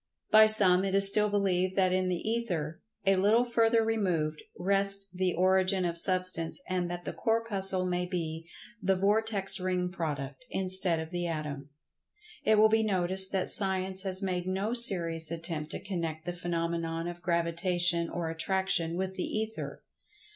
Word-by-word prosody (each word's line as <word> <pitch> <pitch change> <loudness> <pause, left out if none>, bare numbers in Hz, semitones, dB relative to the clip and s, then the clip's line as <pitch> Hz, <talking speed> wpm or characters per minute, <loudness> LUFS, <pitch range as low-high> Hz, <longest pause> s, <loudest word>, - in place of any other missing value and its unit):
By 215 0 +8
some 195 -4 +4
it 195 0 -1
is 195 0 +7
still 210 +1 +4
believed 190 -2 0
that 185 -2 +2
in 185 0 0
the 180 +3 -3
Ether, 180 -9 -3 0.2
a 195 - +4
little 205 +5 +3
further 230 -1 +2
removed, 175 -9 -1 0.2
rests 195 +1 +2
the 185 -1 -1
origin 185 +1 +2
of 170 -1 -2
Substance 185 0 +1
and 180 -1 -2
that 175 0 -6
the - - -4
Corpuscle 200 -5 +1
may 180 0 -2
be 165 -2 -5 0.3
the 190 0 +2
"vortex 200 0 +1
ring" 180 -1 -1
product, 150 - -5
instead 185 -3 -1
of 160 +1 -7
the 175 -1 -3
Atom. 150 -3 -5 0.7
It 220 0 +3
will 215 +1 +6
be 220 0 +3
noticed 190 -2 0
that 190 -1 0
Science 190 -1 +1
has 190 0 -1
made 180 -1 -2
no 195 +4 -2
serious 170 -9 +2
attempt 165 -2 -4
to - - -4
connect 165 -4 -5
the 175 - -3
phenomenon 170 -1 -3
of 175 0 -7
Gravitation 170 0 0
or 170 -1 -4
Attraction 170 -1 -1
with 190 0 -3
the 185 - -3
Ether. 220 0 -5
185 Hz, 160 wpm, -29 LUFS, 170-195 Hz, 0.7 s, By